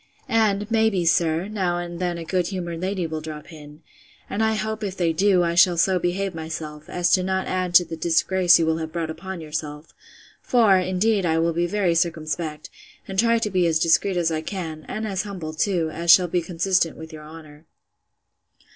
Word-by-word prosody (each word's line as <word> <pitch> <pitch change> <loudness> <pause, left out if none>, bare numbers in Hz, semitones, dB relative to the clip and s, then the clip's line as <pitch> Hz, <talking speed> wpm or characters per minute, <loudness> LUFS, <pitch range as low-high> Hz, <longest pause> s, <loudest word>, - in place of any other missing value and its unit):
And, 210 -1 +1
may 220 -1 +3
be, 185 -5 -1
sir, 165 +1 +2
now 190 -5 -1
and 175 -1 -6
then 175 -1 -2
a 165 - -7
good 180 +1 0
humoured 175 -4 -5
lady 185 -1 -2
will 160 -1 -4
drop 155 +1 -9
in; 150 0 -13 0.5
and, 205 - -1
I 220 0 +1
hope, 220 +1 -3
if 195 -2 -4
they 170 -2 +1
do, 185 +1 +3
I 170 0 0
shall 175 0 +4
so 185 +2 +2
behave 185 +2 -2
myself, 160 -2 -7
as 175 -1 +2
not 190 +1 -1
to - - -7
add 185 -1 -2
to 175 - +7
the 165 - -6
disgrace 175 +2 +3
you 165 - +1
will 160 0 +1
have 160 -1 -5
brought 165 -1 -3
upon 185 +2 -7
yourself: 150 -1 -6 0.5
for, 225 -6 +4
indeed, 185 +3 +1
I 165 -2 +1
will 165 +1 +1
be 170 +1 0
very 190 -2 +1
circumspect, 160 -2 -2 0.4
and 190 0 -3
try 230 +1 +4
to 220 -2 -2
be 180 -2 +2
as 160 -1 +2
discreet 170 +4 +2
as 170 -1 +1
I 155 -1 -2
can; 160 -4 -6
and 220 +1 -4
as 195 -3 -2
humble 185 -7 -6
too, 165 -1 0
as 170 +2 -5
shall 180 +1 +7
be 175 +1 0
consistent 175 0 0
with 160 0 -10
your 155 -1 -9
honour. 155 0 -13
175 Hz, 210 wpm, -23 LUFS, 160-190 Hz, 0.5 s, to